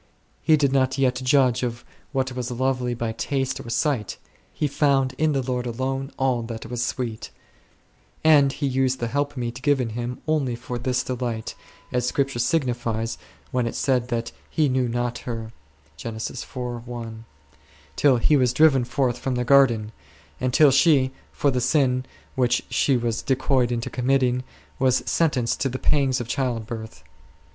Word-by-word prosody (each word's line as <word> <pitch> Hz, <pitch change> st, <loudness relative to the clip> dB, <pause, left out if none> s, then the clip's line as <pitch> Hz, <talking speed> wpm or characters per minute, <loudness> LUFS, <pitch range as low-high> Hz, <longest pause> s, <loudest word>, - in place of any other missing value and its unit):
He 155 Hz, -, +4 dB
did 140 Hz, -2 st, +2 dB
not 130 Hz, 0 st, +2 dB
yet 130 Hz, -1 st, +1 dB
judge 130 Hz, -2 st, +3 dB
of 120 Hz, -1 st, -4 dB, 0.3 s
what 130 Hz, -2 st, -1 dB
was 125 Hz, -1 st, -4 dB
lovely 125 Hz, 0 st, -1 dB
by 115 Hz, -1 st, -2 dB
taste 135 Hz, +3 st, -2 dB
or -, -, -8 dB
sight; 120 Hz, -2 st, 0 dB, 0.3 s
he -, -, -2 dB
found 135 Hz, -2 st, +2 dB
in 155 Hz, -1 st, +2 dB
the 135 Hz, -2 st, 0 dB
Lord 125 Hz, -1 st, -2 dB
alone 135 Hz, +3 st, -3 dB
all 130 Hz, -3 st, +1 dB
that 115 Hz, -1 st, -6 dB
was 120 Hz, +1 st, -3 dB
sweet; 120 Hz, -3 st, -3 dB, 0.9 s
and 145 Hz, -3 st, +6 dB
he 145 Hz, -, -3 dB
used 130 Hz, -1 st, +1 dB
the 120 Hz, -, -1 dB
helpmeet 130 Hz, -3 st, -2 dB
given 135 Hz, -4 st, +2 dB
him 120 Hz, +2 st, -4 dB
only 145 Hz, -6 st, +1 dB
for 120 Hz, +1 st, -5 dB
this 125 Hz, +1 st, 0 dB
delight, 120 Hz, -3 st, -3 dB, 0.4 s
as 125 Hz, -1 st, 0 dB
Scripture 135 Hz, -2 st, 0 dB
signifies 120 Hz, -4 st, -1 dB, 0.3 s
when 125 Hz, -2 st, 0 dB
it -, -, -4 dB
said 125 Hz, -3 st, +1 dB
that 115 Hz, -1 st, -2 dB, 0.2 s
"he 155 Hz, -2 st, +2 dB
knew 130 Hz, -1 st, +1 dB
her 120 Hz, -2 st, -3 dB, 0.5 s
not8" 120 Hz, -, -6 dB, 0.7 s
till 135 Hz, -4 st, +4 dB
he 150 Hz, +6 st, +3 dB
was 125 Hz, -3 st, +3 dB
driven 135 Hz, -2 st, +5 dB
forth 125 Hz, 0 st, 0 dB
from 130 Hz, 0 st, -2 dB
the 125 Hz, 0 st, -1 dB
garden, 120 Hz, -5 st, +4 dB, 0.5 s
and 130 Hz, 0 st, 0 dB
till 145 Hz, +2 st, +6 dB
she, 135 Hz, -2 st, +4 dB, 0.2 s
for 140 Hz, -, +1 dB
the 125 Hz, -1 st, 0 dB
sin 130 Hz, -2 st, +2 dB, 0.3 s
which 125 Hz, -1 st, +1 dB
she 135 Hz, -3 st, +3 dB
was 115 Hz, -1 st, -1 dB
decoyed 130 Hz, -2 st, +1 dB
into 120 Hz, -1 st, -2 dB
committing, 125 Hz, -1 st, +1 dB, 0.4 s
was 130 Hz, -2 st, +3 dB
sentenced 130 Hz, -8 st, +1 dB
to 135 Hz, -, +1 dB
the 130 Hz, -, -4 dB
pangs 135 Hz, -2 st, +2 dB
of 120 Hz, -, -5 dB
childbirth. 115 Hz, -, -3 dB
125 Hz, 155 wpm, -24 LUFS, 120-135 Hz, 0.9 s, and